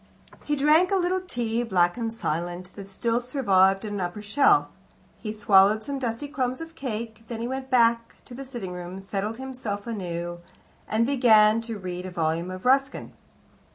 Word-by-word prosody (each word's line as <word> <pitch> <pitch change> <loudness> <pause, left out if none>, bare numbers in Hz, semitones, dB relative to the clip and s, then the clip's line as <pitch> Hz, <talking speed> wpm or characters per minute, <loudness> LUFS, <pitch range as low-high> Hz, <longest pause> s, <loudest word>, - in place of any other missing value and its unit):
He 295 - 0
drank 305 +6 +4
a 395 - +2
little 370 0 +1
tea, 240 -9 -2
black 175 -6 +2
and 230 -2 -3
silent, 175 -2 -4
that 200 -1 -9
still 230 +4 0
survived 195 -6 +2
upon 205 -1 -4
an - - -2
upper 180 +4 -4
shelf. 290 - +4 0.5
He 215 - -4
swallowed 210 0 +4
some 280 +3 -4
dusty 240 +2 -3
crumbs 260 -3 -2
of 325 0 -8
cake. 225 -5 -5
Then 230 -1 -5
he 235 - -3
went 265 +1 -5
back 230 -2 +3
to - - -12
the 270 +3 -7
sitting 240 -8 -6
room, 180 +1 -7
settled 200 +3 -4
himself 250 -6 -5
anew, 175 -6 -4 0.5
and 220 +2 +1
began 230 -5 +5
to 230 -1 -5
read 180 -1 -5
a - - -5
volume 170 0 -1
of 185 +3 -8
Ruskin. 270 +2 +1
225 Hz, 180 wpm, -25 LUFS, 190-260 Hz, 0.5 s, began